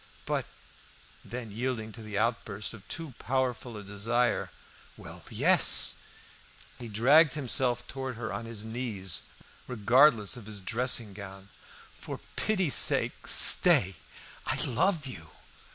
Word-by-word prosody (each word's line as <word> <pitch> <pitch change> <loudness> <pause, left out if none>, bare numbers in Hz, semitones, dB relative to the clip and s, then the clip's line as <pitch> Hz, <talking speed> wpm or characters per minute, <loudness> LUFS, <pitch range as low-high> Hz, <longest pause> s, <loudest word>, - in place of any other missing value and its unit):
"But - - -2 0.4
" - - -26 0.3
Then, 120 -3 -8
yielding 115 0 -4
to 115 - -12
the 105 -2 -6
outburst 115 -2 -3
of 105 -3 -14
too 165 -5 -6
powerful 125 -2 -3
a 105 - -9
desire, 115 +5 -1 0.5
"Well, - - -12
yes!" - - +4 0.8
He 120 - -8
dragged 135 +8 +4
himself 125 -3 -2
towards 130 -3 -6
her 110 -1 -5
on 115 - -6
his 110 -2 -6
knees, 110 -6 -3 0.5
regardless 125 0 +3
of 115 -4 -11
his 105 -2 -5
dressing 115 +1 -1
gown. 95 -1 -11 0.5
"For - - -8 0.2
pity's 190 -9 0
sake, - - +2
stay. 95 0 +6 0.5
I - - 0
love 155 - 0
you!" 85 -12 -10
115 Hz, 130 wpm, -28 LUFS, 105-130 Hz, 0.8 s, stay